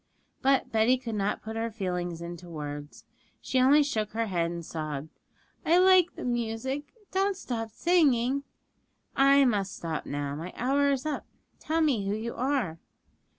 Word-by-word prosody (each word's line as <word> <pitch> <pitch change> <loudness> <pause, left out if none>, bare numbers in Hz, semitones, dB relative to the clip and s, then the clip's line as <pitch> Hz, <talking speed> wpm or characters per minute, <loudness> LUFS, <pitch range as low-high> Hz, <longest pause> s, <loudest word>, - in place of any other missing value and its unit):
But 270 0 +2
Betty 225 +3 +4
could 235 -3 -6
not 205 0 -1
put 220 0 -6
her 225 +1 -1
feelings 180 -5 -3
into 175 0 -8
words; 145 -2 -7 0.3
she 260 - 0
only 280 +4 +6
shook 215 -8 -2
her 230 +1 0
head 175 -5 0
and 170 -1 -6
sobbed, 155 -2 -5 0.5
'I 335 +2 +4
like 370 -1 +5
the - - -6
music; 245 +4 -2 0.2
don't 390 0 +1
stop 225 - -4
singing.' 275 -3 +2 0.7
'I 275 0 +6
must 200 -5 0
stop 160 -2 -4
now: 145 0 -3
my 165 +5 -6
hour 280 +3 +2
is 275 -1 0
up. 305 -2 -3 0.3
Tell 325 +1 0
me 250 -11 +1
who 200 - 0
you 230 +2 -4
are.' 250 - -1
230 Hz, 160 wpm, -28 LUFS, 175-275 Hz, 0.7 s, only